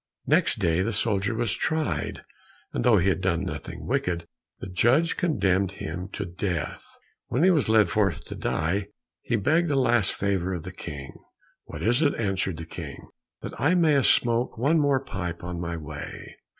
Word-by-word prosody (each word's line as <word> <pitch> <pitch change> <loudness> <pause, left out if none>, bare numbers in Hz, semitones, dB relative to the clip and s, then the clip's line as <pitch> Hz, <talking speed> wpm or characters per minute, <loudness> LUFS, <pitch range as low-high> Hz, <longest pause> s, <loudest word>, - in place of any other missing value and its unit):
Next - - +3
day 85 +1 +2
the 115 +4 -1
soldier 100 0 +1
was 115 -2 0
tried, 160 -1 -1 0.5
and - - -1
though 120 -4 +5
he 90 0 +2
had 95 - 0
done 90 -2 +1
nothing 95 - -6
wicked, 85 -2 -1 0.3
the - - -6
judge 120 - +3
condemned 100 - +1
him 90 0 -5
to 105 - -3
death. 90 -1 -3 0.4
When 130 +7 +1
he 185 - +6
was 150 -10 +2
led 105 -6 +4
forth 100 -5 +1
to - - -7
die, 95 +6 -1 0.3
he 120 - -1
begged 160 - +2
a 145 - +1
last 120 -6 +3
favor 95 -2 0
of 85 - -6
the 90 - -7
King. 70 -6 -7 0.5
"What - - -7
is 120 +6 +2
it?" 145 -3 +3
asked 95 -4 0
the 80 - -6
King. 75 -4 -8 0.3
"That - - -6
I 160 +6 +4
may 155 -5 +4
smoke 120 -1 +2
one 145 +8 +3
more 140 -2 +3
pipe 90 -4 -5
on 90 -1 -4
my 85 -1 -3
way." 75 -1 -8
100 Hz, 180 wpm, -26 LUFS, 90-125 Hz, 0.5 s, he